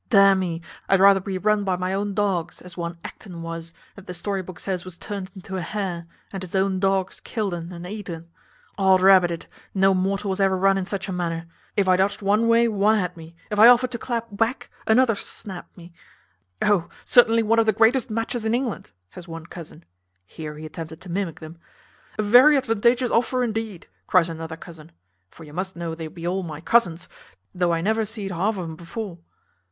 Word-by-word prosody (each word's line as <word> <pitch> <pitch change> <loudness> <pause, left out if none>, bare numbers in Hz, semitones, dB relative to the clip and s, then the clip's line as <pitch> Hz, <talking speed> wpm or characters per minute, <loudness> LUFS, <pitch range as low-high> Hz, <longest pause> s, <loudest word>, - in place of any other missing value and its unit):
D 215 - +4
n 195 -1 +7
me, 170 -3 -2 0.3
I'd 195 - +5
rather 195 0 +7
be 190 0 -4
run 210 +2 +2
by 190 -2 0
my 185 +1 -2
own 200 0 -2
dogs, 185 -5 -1
as 180 -2 -10
one 170 -1 -4
Acton 175 -5 -9
was, 165 0 -6 0.2
that 200 - -13
the 180 - -5
story 195 +2 -2
book 185 -1 -10
says 185 -3 -3
was 185 -2 -10
turned 200 -3 -6
into 190 0 -6
a - - -2
hare, 175 -2 -4 0.3
and 195 - -4
his 185 0 -7
own 190 0 +1
dogs 195 -1 0
killed 210 -5 -3
un 170 0 -5
and 175 0 -8
eat 205 +1 -7
un. 165 0 -7 0.5
Od 190 -1 +5
rabbit 185 -2 +6
it, 170 -1 -5 0.3
no 195 0 +4
mortal 195 +2 0
was 190 - -3
ever 190 -1 +3
run 195 +1 +4
in 190 -1 -2
such 195 -1 -3
a - - -4
manner; 170 -2 -2 0.3
if 200 -2 +3
I 185 0 +5
dodged 200 +2 0
one 210 +4 +3
way, 230 0 +5
one 215 0 +3
had 180 -3 -2
me; 165 0 -12 0.2
if 210 - -1
I 220 - +10
offered 245 +1 +6
to 235 - -4
clap 230 -1 -3
back, 225 +5 -1 0.2
another 230 +1 +5
snapped 195 -2 -8
me. 170 0 -13 0.7
`O! 200 -5 +2 0.2
certainly 230 -2 +5
one 230 +1 +3
of 225 - +3
the - - +6
greatest 225 +4 +3
matches 225 +1 -2
in 220 +1 +1
England,' 240 - -3
says 170 - -12
one 165 -1 -8
cousin 165 -1 -11 0.4
(here 150 - -8
he 155 - -8
attempted 160 +1 -8
to 185 - -11
mimic 175 -3 -2
them); 160 +1 -11 0.6
`A 215 - 0
very 255 +7 +7
advantageous 240 0 +2
offer 250 +2 +2
indeed,' 220 -5 -3 0.2
cries 175 -2 +4
another 160 0 -6
cousin 165 -2 -12 0.4
(for 165 - -14
you 150 -1 -12
must 185 +3 -4
know 170 -1 -4
they 160 -1 -6
be 165 +2 -9
all 190 +2 0
my 155 -4 -6
cousins, 175 -3 +2 0.5
thof 180 -1 +1
I 165 -1 +1
never 220 +5 +1
zeed 210 -2 -5
half 195 +5 0
o' 185 - -3
um 160 -1 -6
before). 175 +2 -7
190 Hz, 215 wpm, -24 LUFS, 170-215 Hz, 0.7 s, I